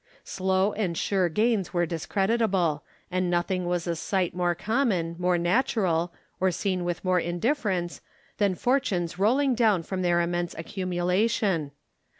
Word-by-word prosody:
Slow 190 +2 0
and 180 -6 -2
sure 190 -3 +1
gains 210 +1 0
were 175 0 +3
discreditable; 190 -1 0 0.3
and 185 0 0
nothing 175 +1 0
was 175 -1 -1
a 170 -1 -1
sight 185 +1 -1
more 175 -1 0
common, 195 -6 0
more 180 0 +2
natural, 175 -3 +1 0.3
or 190 - +3
seen 185 +1 -1
with 175 +1 -3
more 185 -1 +3
indifference, 175 - -1 0.4
than 200 -3 +2
fortunes 190 -9 0
rolling 260 +7 +3
down 220 -7 +2
from 185 +2 -4
their 175 -1 +2
immense 175 0 -1
accumulation. 180 0 0
185 Hz, 140 wpm, -26 LUFS, 175-205 Hz, 0.4 s, were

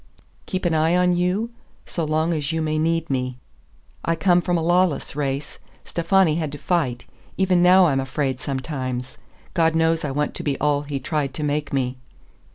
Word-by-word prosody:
"Keep 185 -1 -3
an 170 - +2
eye 160 +2 +3
on 180 0 +3
you? 180 +6 0 0.3
So 170 - -3
long 155 +2 +1
as 150 -2 -2
you 160 - -1
may 155 -1 0
need 165 +1 +1
me." 125 -2 -2 0.7
"I 165 - +1
come 175 +1 +3
from 175 0 0
a 165 - -1
lawless 175 -3 +1
race. 140 0 -3 0.3
Stefani 170 -1 +2
had 155 -4 -2
to - - -5
fight. 140 -6 -1 0.3
Even 185 -2 +3
now 180 +1 +7
I'm 140 -5 +2
afraid 135 -1 -2
sometimes. 130 -2 -4 0.3
God 165 -2 +2
knows 165 0 +2
I 150 - -1
want 145 +2 -1
to - - -6
be 140 -2 -1
all 145 -1 +2
he 145 -1 -4
tried 140 0 -2
to 155 - -3
make 145 0 -1
me." 130 -2 -1
155 Hz, 185 wpm, -23 LUFS, 140-175 Hz, 0.7 s, now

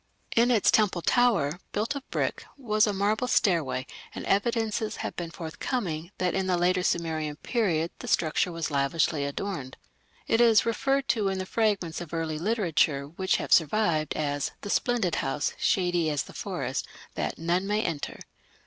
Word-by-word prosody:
In 235 +2 +5
its 230 -5 +4
temple 190 -5 +2
tower, 195 - +2
built 215 +6 0
of 280 -1 -8
brick, - - -1
was 215 -4 +2
a - - +2
marble 205 +4 0
stairway, 160 - +1 0.3
and - - -5
evidences 220 +1 0
have - - -4
been 175 -2 -4
forthcoming 165 0 -4
that 180 -1 0
in 190 -1 0
the 180 -1 +2
later 180 +1 +2
Sumerian 160 -4 -1
period 170 -4 0
the - - -8
structure 165 +3 +1
was 165 -2 -3
lavishly 145 +2 +1
adorned. 140 -3 -4 0.5
It 225 - +2
is 225 -3 +5
referred 270 +4 0
to 215 -4 +2
in 190 0 -1
the 185 - -3
fragments 195 -6 0
of 170 -1 -6
early 160 -2 -2
literature 165 -8 +1
which 190 +4 0
have - - 0
survived 160 -3 +2
as 145 -2 -1
"the 205 - -4
splendid 235 -9 +1
house, 145 +2 -1
shady 175 -3 +2
as 145 -3 0
the - - -13
forest", - - -3 0.3
that - - -3
"none 175 +4 0
may 210 +1 +1
enter". 160 -4 -4
180 Hz, 165 wpm, -27 LUFS, 160-215 Hz, 0.5 s, In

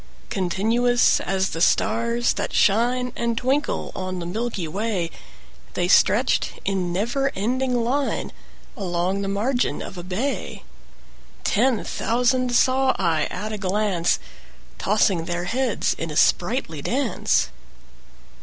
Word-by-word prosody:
Continuous 225 +6 +2
as 190 0 0
the 165 - -4
stars 235 +5 +2
that - - -4
shine 245 +4 +2
And 235 -1 -1
twinkle 265 +5 0
on 185 -1 -4
the 175 - -5
milky 205 -1 -3
way, 190 -1 -2 0.6
They - - +1
stretched - - +3
in 190 -3 -1
never 240 +9 0
ending 245 +3 0
line 270 +4 -1 0.4
Along 185 -2 -1
the 195 - -2
margin 235 +6 0
of 185 - -8
a - - -7
bay: 210 +10 -3 0.8
10 245 +3 +3
Ten - - -6
thousand 250 +1 +1
saw 260 +1 +3
I 165 -5 +1
at 210 +4 -5
a 210 - -4
glance, 190 -3 +1 0.6
Tossing 195 -5 +2
their 175 0 -2
heads 245 +5 0
in 165 - -3
sprightly 175 - +1
dance. 265 - 0
215 Hz, 125 wpm, -23 LUFS, 185-245 Hz, 0.8 s, stretched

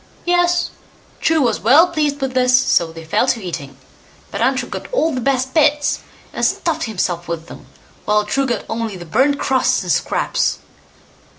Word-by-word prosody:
Yes! 350 0 +2 0.5
True 320 -1 +2
was 235 -5 +1
well 295 +10 +5
pleased 300 -4 -1
with 265 -1 -2
this, 250 0 +4
so 170 -9 +2
they 165 0 -10
fell 170 +10 +1
to 250 - +1
eating, 145 -8 -7 0.5
but - - -4
Untrue - - +1
got - - -7
all 330 -11 +1
the 255 - -2
best 260 0 0
bits, 295 -2 +2 0.3
and - - -4
stuffed - - 0
himself 180 -5 -2
with 165 -1 -4
them, - - -12 0.4
while 210 0 +2
True 270 +6 0
got 235 -4 -2
only 225 -2 -3
the 175 -1 -9
burnt 265 - +2
crusts 265 -2 +1
and - - -2
scraps. - - 0
255 Hz, 175 wpm, -18 LUFS, 205-290 Hz, 0.5 s, well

